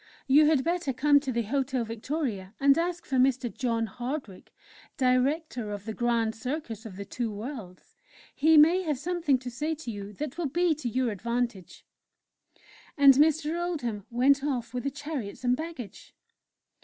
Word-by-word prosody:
You 295 +2 +6
had 300 -4 +3
better 340 -4 -1
come 285 +3 +4
to 275 -2 -4
the 235 -1 0
Hotel 260 +1 -1
Victoria, 225 -4 -4
and 275 0 +5
ask 345 +2 -2
for 265 - -1
Mr. 255 -2 +2
John 230 -4 0
Hardwick, 240 -1 -6 0.5
Director 255 -2 +1
of 205 -1 -6
the 220 - -4
'Grand 230 -1 0
Circus 230 -2 -5
of 195 - -10
the 200 +1 -7
Two 230 +2 -3
Worlds' 210 -4 -8 0.4
he 315 +2 +4
may 330 +5 +6
have 305 -6 -1
something 325 -2 +1
to 250 0 -7
say 305 +6 -2
to 290 -6 -6
you 205 -1 -7
that 300 - -6
will 320 -5 -1
be 345 +3 +2
to 290 -5 -4
your 250 0 0
advantage." 235 -2 -3 1.1
And 280 -1 +8
Mr. 315 +4 +2
Oldham 240 - -3
went 270 +4 +3
off 255 -5 -2
with 250 +1 -4
the - - +2
chariots 280 -7 -6
and 250 0 +3
baggage. 310 -7 -8
260 Hz, 170 wpm, -28 LUFS, 230-300 Hz, 1.1 s, And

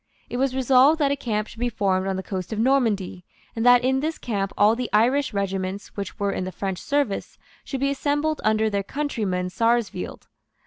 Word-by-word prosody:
It 245 - -2
was 260 0 0
resolved 265 +4 +5
that 285 -3 +2
a - - +2
camp 215 -6 -2
should 225 - -13
be 245 0 0
formed 195 -4 0
on 190 - -1
the 190 - -4
coast 185 -1 -5
of 220 - -3
Normandy, 220 -7 +1 0.3
and 225 - -1
that 245 0 +6
in 265 +1 +2
this 315 +3 -2
camp 200 -4 -2
all 210 +2 +5
the 245 -1 -3
Irish 250 +7 +3
regiments 195 -1 -3
which 200 -1 -5
were 200 -1 0
in 185 - -3
the 185 - -4
French 190 -1 -4
service 285 -8 -1 0.3
should 270 -2 -5
be 275 0 +2
assembled 295 +2 -1
under 220 0 +2
their 200 -2 0
countryman 200 -8 -2
Sarsfield. 230 +1 -1
225 Hz, 205 wpm, -24 LUFS, 195-265 Hz, 0.3 s, that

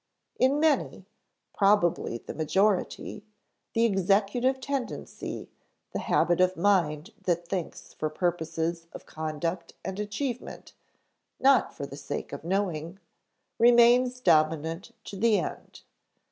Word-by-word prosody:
In 270 +3 +3
many 315 -1 +1 0.5
(probably 190 - +2
the - - -9
majority) 190 +5 0 0.5
the 230 0 +3
executive 205 +6 +2
tendency, 265 -1 -5 0.4
the - - -3
habit 175 +1 +2
of 185 -1 +2
mind 170 -2 +1
that 175 -1 -1
thinks 180 -3 -5
for 155 - -2
purposes 165 0 -2
of - - -10
conduct 165 +2 -4
and 190 +1 -4
achievement, 225 +4 -5 0.7
not 270 0 +4
for 140 - -5
the 140 0 -9
sake 145 - -5
of - - -6
knowing, 175 -2 -2 0.6
remains 245 +2 +5
dominant 160 +1 +1
to 200 - -8
the 220 +1 +3
end. 170 - -6
190 Hz, 115 wpm, -28 LUFS, 165-230 Hz, 0.7 s, remains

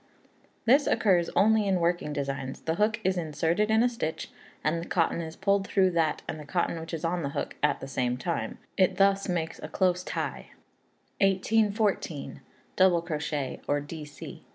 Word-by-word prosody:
This 275 +5 +5
occurs 185 -7 +3
only 215 0 +4
in 190 -2 +2
working 170 -2 0
designs; 135 -2 -4
the 160 - -1
hook 215 +5 +1
is 185 0 +1
inserted 165 +6 0
in 220 +1 +4
a - - +5
stitch, 230 -10 -4 0.3
and 165 +2 0
the 170 - -7
cotton 170 -1 +1
is 160 -1 -7
pulled 200 0 +1
through 190 -2 +3
that 165 -3 0
and 155 - -4
the - - -7
cotton 170 +1 -1
which 160 0 -8
is 165 0 -3
on 175 +1 0
the 140 - -2
hook - - -3
at 150 - +1
the 135 - -6
same 125 -2 -1
time; 170 +6 -3 0.2
it 185 -2 +3
thus 195 0 +3
makes 165 -2 -2
a - - -6
close 180 -1 +1
tie. - - -4 0.7
1814. 200 -4 +1 0.3
Double 180 -3 +4
Crochet, 150 -4 -3
or 145 0 +2
Dc. 145 0 -9
170 Hz, 175 wpm, -28 LUFS, 155-195 Hz, 0.7 s, This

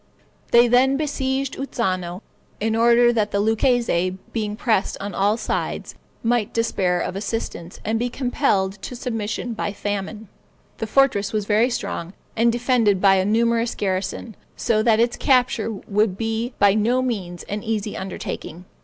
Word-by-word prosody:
They 240 +1 +6
then 260 +3 +4
besieged 275 -2 -2
Uzzano, 185 -8 -2 0.4
in 220 +1 0
order 235 +1 +5
that 215 -3 +1
the 200 - -1
Lucchese, 220 -5 +1 0.2
being 210 -2 -2
pressed 220 -3 0
on 200 +1 -5
all 205 +3 +2
sides, - - -3 0.3
might 235 -2 0
despair 190 -6 +1
of 180 - -3
assistance, 195 -4 -4
and 220 +1 0
be 245 +1 -1
compelled 210 -7 0
to 250 - -6
submission 230 -1 -3
by 205 -2 -3
famine. 205 +2 -4 0.5
The 225 - -2
fortress 220 -5 +2
was 210 -2 -1
very 215 +4 +3
strong, 180 -7 -4 0.2
and 230 +1 +3
defended 235 -5 +2
by 195 0 +5
a 190 - +1
numerous 230 +2 +1
garrison, 195 +3 -3 0.2
so 220 -2 +1
that 220 -1 +3
its 235 +1 +2
capture 250 -4 +2
would 205 -1 -1
be 225 +2 -2
by 200 -1 +5
no 235 +5 +2
means 190 -8 -3
an 205 +1 -4
easy 215 -2 -3
undertaking. 180 -2 -6
220 Hz, 155 wpm, -22 LUFS, 200-240 Hz, 0.5 s, They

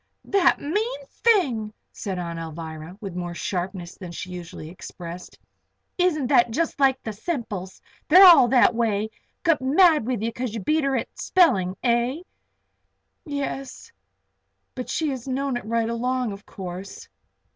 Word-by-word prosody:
"The 375 -3 +4
mean 445 +11 -2
thing!" 260 - +1 0.2
said 195 -3 -5
Aunt 170 -1 -4
Alvirah, 160 +1 -7
with 195 -4 -6
more 175 -1 -4
sharpness 180 -1 -4
then 180 -3 -7
she 180 +1 -7
usually 175 -3 -8
expressed. 175 0 -9 0.6
"Isn't 350 -6 +1
that 240 -2 +4
jest 320 +6 -2
like 265 -1 +3
the 220 - -4
Semples? 210 - -5 0.3
They're 370 +5 +9
all 340 -9 +9
that 245 -1 +5
way. 220 -2 0 0.3
Got 330 -5 +3
mad 305 - +4
with 245 -4 -1
you 230 - 0
because 235 -1 -4
you - - -2
beat 305 +8 +1
her 275 -1 +1
at - - -4
spelling; 195 - +3
eh?" 245 +6 +1 1.0
"Yes. 275 -2 -5 0.8
But 250 - -6
she 315 -2 0
has 260 -1 -6
known 270 0 -1
it 240 - -4
right 230 0 0
along, 250 0 -1
of 200 +1 -10
course." 185 +1 -8
235 Hz, 150 wpm, -24 LUFS, 185-285 Hz, 1.0 s, They're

